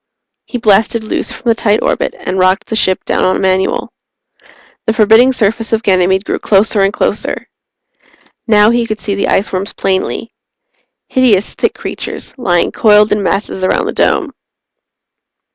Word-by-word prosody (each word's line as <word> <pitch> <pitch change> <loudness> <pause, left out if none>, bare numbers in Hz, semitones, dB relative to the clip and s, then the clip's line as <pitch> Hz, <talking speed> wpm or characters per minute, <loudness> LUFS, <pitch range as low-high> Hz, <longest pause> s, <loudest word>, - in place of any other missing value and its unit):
He 245 - -5
blasted 220 +1 +2
loose 215 - -3
from - - -11
the 230 - +5
tight 220 -1 0
orbit - - -1
and 185 - -4
rocked 185 +1 +2
the 220 - -4
ship 185 -3 0
down - - 0
on 185 - +1
manual. 190 0 -1 0.9
The 220 - +2
forbidding 225 +4 +5
surface 225 -1 -1
of 225 +1 0
Ganymede 190 0 +2
grew - - -2
closer 205 +1 +2
and 195 0 +2
closer. - - -2 1.0
Now 210 -1 +4
he 235 -1 0
could 215 -1 -4
see 205 - -3
the 200 - -1
iceworms 195 0 -1
plainly. 190 +4 -2 0.8
Hideous, 230 -7 +2
thick - - -1
creatures, - - -6
lying 180 -9 0
coiled 210 -1 +4
in 210 - +1
masses 195 -1 -2
around 185 - +1
the - - -3
Dome. - - 0
210 Hz, 155 wpm, -13 LUFS, 190-225 Hz, 1.0 s, the